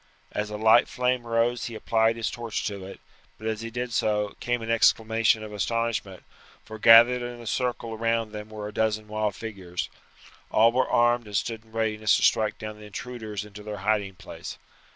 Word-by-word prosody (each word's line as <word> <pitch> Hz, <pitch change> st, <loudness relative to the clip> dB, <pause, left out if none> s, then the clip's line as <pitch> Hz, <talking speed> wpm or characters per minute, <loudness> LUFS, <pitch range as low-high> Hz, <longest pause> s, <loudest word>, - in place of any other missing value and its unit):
As 105 Hz, 0 st, -3 dB
a 105 Hz, -, -5 dB
light 110 Hz, +2 st, +5 dB
flame 125 Hz, -1 st, -1 dB
rose 115 Hz, +1 st, +1 dB
he 115 Hz, -, -6 dB
applied 110 Hz, 0 st, +2 dB
his 115 Hz, -1 st, -2 dB
torch 120 Hz, -2 st, -4 dB
to 100 Hz, -2 st, -4 dB
it; 95 Hz, -, -10 dB, 0.4 s
but 110 Hz, -, -11 dB
as 110 Hz, 0 st, -2 dB
he 115 Hz, -, -5 dB
did 120 Hz, +1 st, -4 dB
so, 105 Hz, -2 st, 0 dB
came 120 Hz, -1 st, -1 dB
an 115 Hz, -, -2 dB
exclamation 115 Hz, -1 st, +3 dB
of 105 Hz, -1 st, -8 dB
astonishment, 110 Hz, -2 st, -2 dB, 0.4 s
for 110 Hz, 0 st, -9 dB
gathered 120 Hz, +3 st, +8 dB
in 120 Hz, 0 st, -6 dB
a 120 Hz, -, -10 dB
circle 120 Hz, -1 st, -2 dB
round 115 Hz, 0 st, 0 dB
them 105 Hz, 0 st, -7 dB
were 105 Hz, -1 st, -6 dB
a 105 Hz, -, -8 dB
dozen 110 Hz, -1 st, 0 dB
wild 105 Hz, -1 st, -1 dB
figures. 95 Hz, -6 st, -5 dB, 0.6 s
All 115 Hz, +1 st, +5 dB
were 130 Hz, +2 st, +1 dB
armed 120 Hz, -1 st, +3 dB
and 105 Hz, -1 st, -1 dB
stood 110 Hz, +1 st, -3 dB
in 110 Hz, -, -23 dB
readiness 110 Hz, -1 st, +1 dB
to -, -, -2 dB
strike 110 Hz, -1 st, +3 dB
down 105 Hz, 0 st, -7 dB
the 105 Hz, -, -11 dB
intruders 110 Hz, -2 st, -6 dB
into 105 Hz, 0 st, -11 dB
their 105 Hz, 0 st, -6 dB
hiding 100 Hz, -3 st, +1 dB
place. -, -, -9 dB
110 Hz, 195 wpm, -26 LUFS, 105-115 Hz, 0.6 s, gathered